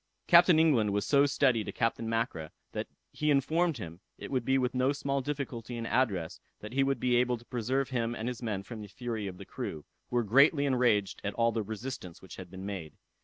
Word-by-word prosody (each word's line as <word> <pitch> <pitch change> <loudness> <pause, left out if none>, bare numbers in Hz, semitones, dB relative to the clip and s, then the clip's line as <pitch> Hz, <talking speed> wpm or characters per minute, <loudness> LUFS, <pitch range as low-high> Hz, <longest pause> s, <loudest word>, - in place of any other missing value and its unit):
Captain 175 -1 +7
England 135 -10 +4
was 100 0 0
so 140 0 +4
steady 130 -5 +2
to - - -5
Captain 115 -1 -1
Mackra, 115 -9 -2 0.2
that - - -4 0.2
he 150 - -1
informed 155 +3 +2
him, 85 -5 -8 0.2
it - - -8
would 130 -3 0
be 130 +3 +2
with 125 -1 0
no 130 +1 +2
small 140 -1 -1
difficulty 125 -4 -4
and 115 - -4
address 100 -10 0 0.2
that 105 +2 -9
he 135 - +2
would 135 -2 0
be 125 0 +2
able 125 0 +2
to 120 - -17
preserve 125 +3 -1
him 120 -2 -1
and 110 - -4
his 125 -1 -4
men 105 -5 -3
from 110 +1 -8
the 105 - -8
fury 110 -1 -4
of 90 -2 -7
the - - -10
crew, 75 - -6 0.2
who - - -4
were 120 - +3
greatly 140 +7 +5
enraged 120 -7 +2
at 100 - -3
the 115 -1 +2
resistance 110 -4 -6
which 95 - -12
had 95 -2 -9
been 95 +1 -8
made. 90 -7 -6
120 Hz, 220 wpm, -30 LUFS, 105-135 Hz, 0.2 s, Captain